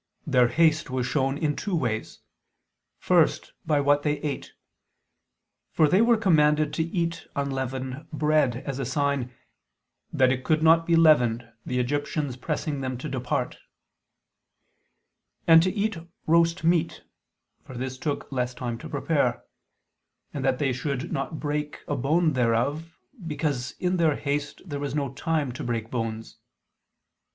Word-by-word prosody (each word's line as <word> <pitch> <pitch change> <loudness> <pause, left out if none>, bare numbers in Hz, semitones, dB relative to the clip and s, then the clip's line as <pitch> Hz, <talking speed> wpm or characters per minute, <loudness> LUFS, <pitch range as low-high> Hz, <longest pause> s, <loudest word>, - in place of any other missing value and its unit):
Their 125 -5 +4
haste 155 +5 +2
was 130 -1 -1
shown 135 0 0
in 150 -2 0
two 200 -4 -2
ways. 120 -8 -2 0.8
First - - +2
by 150 -2 +3
what 145 +1 +3
they 150 0 +1
ate. 150 -3 -4 1.2
For 155 - +3
they 185 +8 +4
were 235 0 +4
commanded 150 -7 +3
to 160 - 0
eat 170 0 -3
unleavened 130 +1 -3
bread, 150 -5 +1
as 140 -1 -4
a - - -1
sign 140 -2 -1 0.8
"that 130 -1 +3
it 130 0 -2
could 155 +2 +1
not 165 +1 +5
be 170 - +4
leavened, 125 -8 +4 0.2
the 125 - -1
Egyptians 145 +1 -1
pressing 145 +1 -3
them 130 -1 -3
to 125 - -6
depart"; 125 -2 -2 1.9
and 165 -1 +8
to 185 +2 +1
eat 215 +1 -1 0.3
roast 165 +1 +3
meat, 165 0 +1 0.6
for 130 - -11
this 130 +1 -4
took 145 -1 -3
less 125 -1 -2
time 120 -2 -4
to - - -9
prepare; - - 0 0.9
and 140 - -4
that 130 -1 +2
they 135 -2 0
should 140 +4 -3
not 155 - -3
break 150 0 -3
a 145 - -1
bone 155 +5 +2
thereof, 130 +7 0 0.3
because 145 -5 -2
in 180 0 0
their 160 -4 +3
haste 145 0 -3
there 145 -5 -5
was 140 -1 -3
no 140 -3 -2
time 150 -1 -1
to 140 +5 -7
break 115 -2 -3
bones. 115 -2 -4
145 Hz, 145 wpm, -26 LUFS, 130-160 Hz, 1.9 s, and